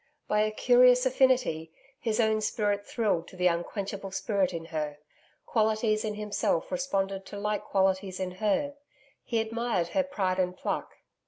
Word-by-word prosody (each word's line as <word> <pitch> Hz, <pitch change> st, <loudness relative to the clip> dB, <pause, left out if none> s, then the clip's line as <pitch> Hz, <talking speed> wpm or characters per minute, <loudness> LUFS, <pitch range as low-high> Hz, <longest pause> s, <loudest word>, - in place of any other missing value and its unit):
By 210 Hz, -, +2 dB
a 215 Hz, -, +2 dB
curious 250 Hz, +3 st, +5 dB
affinity, 255 Hz, -11 st, +2 dB, 0.3 s
his 220 Hz, -1 st, -1 dB
own 220 Hz, -1 st, +3 dB
spirit 205 Hz, -1 st, -1 dB
thrilled 205 Hz, -8 st, 0 dB
to -, -, -13 dB
the 180 Hz, 0 st, -1 dB
unquenchable 195 Hz, +3 st, -1 dB
spirit 190 Hz, -1 st, 0 dB
in 165 Hz, -2 st, -5 dB
her. 150 Hz, -2 st, -2 dB, 0.5 s
Qualities 215 Hz, -1 st, +1 dB
in 215 Hz, -1 st, -2 dB
himself 210 Hz, -3 st, -1 dB
responded 195 Hz, -8 st, -1 dB
to 205 Hz, -, -7 dB
like 210 Hz, +1 st, -2 dB
qualities 190 Hz, -1 st, +1 dB
in 185 Hz, -1 st, -2 dB
her. 280 Hz, +7 st, +1 dB, 0.5 s
He 230 Hz, -2 st, -1 dB
admired 225 Hz, -5 st, -1 dB
her 285 Hz, -, +2 dB
pride 195 Hz, -10 st, -1 dB
and 180 Hz, 0 st, 0 dB
pluck. -, -, -3 dB
210 Hz, 155 wpm, -28 LUFS, 185-230 Hz, 0.5 s, curious